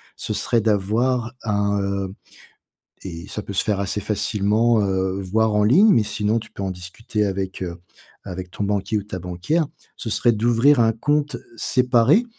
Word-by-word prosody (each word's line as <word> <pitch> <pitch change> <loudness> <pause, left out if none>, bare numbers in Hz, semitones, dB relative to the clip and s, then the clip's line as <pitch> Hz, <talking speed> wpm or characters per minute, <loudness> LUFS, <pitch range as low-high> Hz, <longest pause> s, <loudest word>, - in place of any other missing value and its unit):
ce - - -4
serait 115 +3 +1
d'avoir 115 +4 +1
un, 100 -1 0
heu 100 -1 -2 0.9
et 85 0 -7
ça 105 - -4
peut 100 - -7
se 95 - +1
faire 105 -2 0
assez 100 +1 -1
facilement, 105 +2 +1
heu, 95 0 -1
voir 110 +3 +1
en 105 - +3
ligne, 190 - +6
mais 115 - +4
sinon 105 +1 0
tu - - -13
peux 100 - -6
en 95 - -2
discuter 95 +4 -3
avec, 95 -1 -3
heu, 85 -1 -4 0.5
avec 90 -1 -6
ton 105 - -3
banquier 100 +1 0
ou 100 - -6
ta 95 -3 -6
banquière. 90 - -1 0.3
Ce 115 - -5
serait 120 +2 +3
d'ouvrir 120 +5 +3
un 115 -1 +5
compte 145 +3 0 0.2
séparé, 125 - +3
105 Hz, 175 wpm, -22 LUFS, 95-115 Hz, 0.9 s, ligne